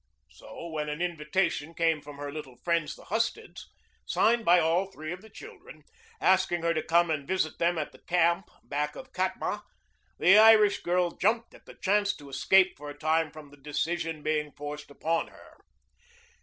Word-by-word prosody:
So -, -, -10 dB
when 150 Hz, -2 st, -3 dB
an 150 Hz, +1 st, -4 dB
invitation 170 Hz, -1 st, -1 dB
came 165 Hz, -2 st, +1 dB
from 145 Hz, 0 st, -11 dB
her 145 Hz, 0 st, -6 dB
little 140 Hz, -5 st, -8 dB
friends 170 Hz, -3 st, -1 dB
the -, -, -15 dB
Husteds, 230 Hz, -, -3 dB, 0.4 s
signed 230 Hz, +1 st, +2 dB
by 175 Hz, -2 st, +6 dB
all 170 Hz, +4 st, +2 dB
three 155 Hz, -2 st, -7 dB
of 180 Hz, -, -9 dB
the 220 Hz, -, -15 dB
children, 430 Hz, -, -13 dB, 0.4 s
asking 185 Hz, -3 st, +2 dB
her 170 Hz, 0 st, +2 dB
to 155 Hz, -, -1 dB
come 170 Hz, +1 st, +2 dB
and 140 Hz, -3 st, -2 dB
visit 185 Hz, -4 st, -1 dB
them 170 Hz, 0 st, +2 dB
at 155 Hz, -, -3 dB
the -, -, -17 dB
camp 175 Hz, +1 st, +1 dB
back 150 Hz, +1 st, -3 dB
of 260 Hz, 0 st, -11 dB
Katma, 185 Hz, +2 st, -2 dB, 0.6 s
the 190 Hz, +5 st, +6 dB
Irish 215 Hz, -2 st, +6 dB
girl 175 Hz, 0 st, +1 dB
jumped 225 Hz, +6 st, 0 dB
at -, -, -18 dB
the -, -, -12 dB
chance 205 Hz, +1 st, +1 dB
to 145 Hz, -1 st, -13 dB
escape 190 Hz, +8 st, +3 dB
for 145 Hz, +1 st, -8 dB
a 145 Hz, -, -9 dB
time 160 Hz, +1 st, +1 dB
from 150 Hz, -2 st, -13 dB
the 145 Hz, -, -16 dB
decision 160 Hz, +2 st, -3 dB
being 150 Hz, -1 st, -1 dB
forced 145 Hz, 0 st, -7 dB
upon 165 Hz, +4 st, -1 dB
her. -, -, -17 dB
170 Hz, 185 wpm, -28 LUFS, 150-190 Hz, 0.6 s, by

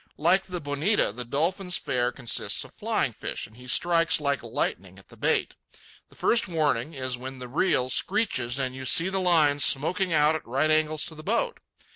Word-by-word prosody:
Like 180 Hz, +5 st, +2 dB
the 180 Hz, -1 st, -6 dB
bonita, 145 Hz, -, 0 dB
the 125 Hz, +4 st, -5 dB
dolphin's 170 Hz, -, -1 dB
fare 125 Hz, 0 st, -1 dB
consists 125 Hz, -2 st, 0 dB
of -, -, -15 dB
flying -, -, -1 dB
fish, -, -, -5 dB
and 110 Hz, -, -15 dB
he 125 Hz, +1 st, -14 dB
strikes 165 Hz, +4 st, +3 dB
like 140 Hz, -1 st, -1 dB
lightning -, -, -4 dB
at -, -, -18 dB
the -, -, -15 dB
bait. -, -, 0 dB, 0.6 s
The -, -, -20 dB
first 230 Hz, -3 st, +2 dB
warning 155 Hz, -4 st, -1 dB
is 130 Hz, -2 st, -3 dB
when 130 Hz, +1 st, -8 dB
the 125 Hz, -1 st, -8 dB
reel 135 Hz, -1 st, +1 dB
screeches 155 Hz, -, 0 dB
and 130 Hz, -2 st, -2 dB
you 130 Hz, 0 st, -8 dB
see 165 Hz, +7 st, +3 dB
the 190 Hz, 0 st, -2 dB
line 155 Hz, -5 st, +3 dB
smoking 175 Hz, +7 st, +3 dB
out 150 Hz, -1 st, +3 dB
at 160 Hz, -, -6 dB
right 140 Hz, +6 st, 0 dB
angles 155 Hz, 0 st, +1 dB
to -, -, -5 dB
the 155 Hz, -, -11 dB
boat. 235 Hz, -, -2 dB
150 Hz, 195 wpm, -26 LUFS, 130-175 Hz, 0.6 s, strikes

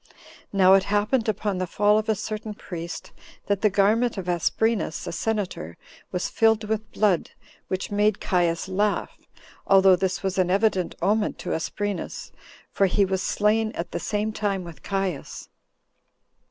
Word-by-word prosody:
Now 190 Hz, -1 st, +5 dB
it 195 Hz, 0 st, +5 dB
happened, 215 Hz, +3 st, +1 dB
upon 205 Hz, -2 st, -1 dB
the 185 Hz, -, -1 dB
fall 210 Hz, +4 st, +3 dB
of 215 Hz, -, -4 dB
a 220 Hz, -, +3 dB
certain 215 Hz, +1 st, -5 dB
priest, 170 Hz, -4 st, -7 dB, 0.3 s
that 200 Hz, -1 st, 0 dB
the 215 Hz, -, +4 dB
garment 215 Hz, +4 st, +2 dB
of 185 Hz, -2 st, -5 dB
Asprenas, 180 Hz, +2 st, 0 dB
a -, -, -4 dB
senator, 180 Hz, -, -3 dB, 0.3 s
was 180 Hz, -, -1 dB
filled 225 Hz, -1 st, +2 dB
with 215 Hz, 0 st, -3 dB
blood, 200 Hz, -6 st, +1 dB, 0.4 s
which 185 Hz, +1 st, -3 dB
made 205 Hz, 0 st, +2 dB
Caius 175 Hz, -2 st, 0 dB
laugh, 200 Hz, +2 st, 0 dB, 0.5 s
although 190 Hz, -1 st, +6 dB
this 185 Hz, +1 st, -2 dB
was 190 Hz, 0 st, -1 dB
an 180 Hz, -1 st, +2 dB
evident 195 Hz, -2 st, +1 dB
omen 210 Hz, +1 st, +1 dB
to -, -, -4 dB
Asprenas, 205 Hz, +4 st, -4 dB, 0.4 s
for 195 Hz, -, +3 dB
he 195 Hz, +2 st, +2 dB
was 190 Hz, 0 st, -1 dB
slain 215 Hz, +2 st, +1 dB
at 170 Hz, -, -5 dB
the -, -, -3 dB
same 210 Hz, +1 st, -1 dB
time 200 Hz, -3 st, -1 dB
with 170 Hz, -2 st, -11 dB
Caius. 195 Hz, -7 st, -3 dB
200 Hz, 155 wpm, -25 LUFS, 185-215 Hz, 0.5 s, although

